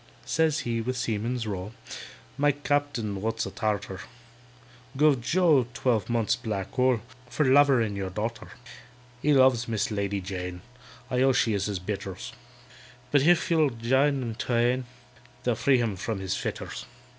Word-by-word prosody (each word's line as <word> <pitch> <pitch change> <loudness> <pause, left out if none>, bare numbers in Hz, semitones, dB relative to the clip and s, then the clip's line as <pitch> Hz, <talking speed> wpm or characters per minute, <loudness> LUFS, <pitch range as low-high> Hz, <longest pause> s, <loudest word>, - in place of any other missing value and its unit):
Says 155 -1 +1
he, 115 -3 -2
with 125 +2 -3
seaman's 115 +1 -2
roll, 100 0 -5 0.6
"My 145 +1 +3
Captain 145 -8 -1
(wot's 110 +1 -1
a - - -6
Tartar) 105 -3 -2 1.0
Guv 145 -3 +4
JOE 150 -2 +3
twelve 115 -6 0
months' 115 -2 +1
black 100 -4 -4
hole, 130 -3 +2 0.3
For 150 - 0
lovering 130 -6 +4
your 95 -1 -3
darter. 110 +5 -4 0.7
"He 150 - +2
loves 130 -3 +4
MISS 110 -1 -1
LADY 100 -1 -1
JANE 90 -1 -6 0.5
(I 125 0 +1
own 135 0 +4
she 115 -3 +2
is 100 -1 0
his 100 -2 -2
betters), 95 0 -5 0.8
But 145 - +5
if 175 +3 +3
you'll 160 -3 +4
jine 130 +4 +1
them 115 -2 -3
twain, 120 +2 0 0.6
They'll 125 - +2
free 130 +4 +3
him 115 -4 0
from 105 +2 -3
his 95 0 -2
fetters. - - -5
120 Hz, 150 wpm, -27 LUFS, 105-135 Hz, 1.0 s, But